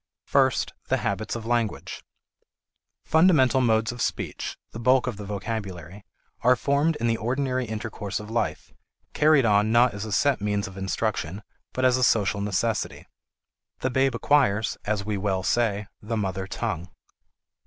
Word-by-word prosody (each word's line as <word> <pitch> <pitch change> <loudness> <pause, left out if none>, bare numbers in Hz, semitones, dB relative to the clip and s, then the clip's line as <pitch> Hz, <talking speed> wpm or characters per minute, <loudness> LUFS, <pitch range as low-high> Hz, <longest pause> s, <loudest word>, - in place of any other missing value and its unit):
First, 130 -3 +2
the - - +2
habits 100 +3 -2
of 115 -1 -6
language. 115 -2 -2 1.0
Fundamental 155 -6 +4
modes 115 -1 +2
of 120 - -7
speech, - - -3
the 115 - -7
bulk 130 +2 +3
of 125 -5 -3
the 105 - -7
vocabulary, 100 -3 -5 0.4
are 125 +2 +4
formed 145 +5 +1
in 120 - -3
the 115 -1 +2
ordinary 130 +3 -1
intercourse 105 -2 -4
of 105 +1 -9
life, 115 -1 -2 0.4
carried 150 -4 +4
on 105 0 +3
not 120 0 +4
as 100 0 -5
a 110 - -6
set 140 +2 +2
means 105 -1 -1
of 95 - -11
instruction 95 0 -2 0.3
but 130 - -1
as 130 0 +4
a 130 - 0
social 105 -3 +2
necessity. 105 +2 -1 0.8
The 130 - 0
babe 130 0 +2
acquires, 115 -5 +2
as 105 -1 -1
we 105 -1 -1
well 95 -1 -1
say, 105 0 +1 0.2
the 115 +2 -3
mother 95 -2 -2
tongue. 90 -2 -4
110 Hz, 155 wpm, -25 LUFS, 100-125 Hz, 1.0 s, Fundamental